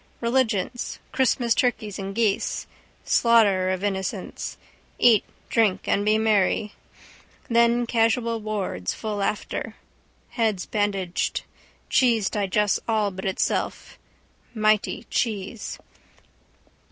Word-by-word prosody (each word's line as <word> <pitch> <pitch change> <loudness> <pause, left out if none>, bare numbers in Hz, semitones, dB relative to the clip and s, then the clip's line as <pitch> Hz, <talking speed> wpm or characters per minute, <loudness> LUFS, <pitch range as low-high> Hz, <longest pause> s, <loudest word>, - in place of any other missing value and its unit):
Religions. 240 -2 0
Christmas 245 -2 +2
turkeys 220 -5 -1
and 195 0 -5
geese. 215 -3 0 0.4
Slaughter 205 -6 +4
of 185 +1 -2
innocents. 190 -2 -3 0.4
Eat 230 -4 +5 0.2
drink 220 -5 +1
and 200 - +2
be 215 +1 +3
merry. 210 -1 +2 0.8
Then 235 +1 +4
casual 230 0 +1
wards 205 - -3
full 210 -2 -3
after. 205 +1 -3 0.5
Heads 220 -6 0
bandaged. 195 -4 -1 0.4
Cheese 230 -6 +3
digests 205 0 +1
all 215 -3 +1
but 190 0 -7
itself. 190 0 -2 0.6
Mity 215 -1 +1
cheese. 215 -1 -2
215 Hz, 95 wpm, -24 LUFS, 195-230 Hz, 0.8 s, Eat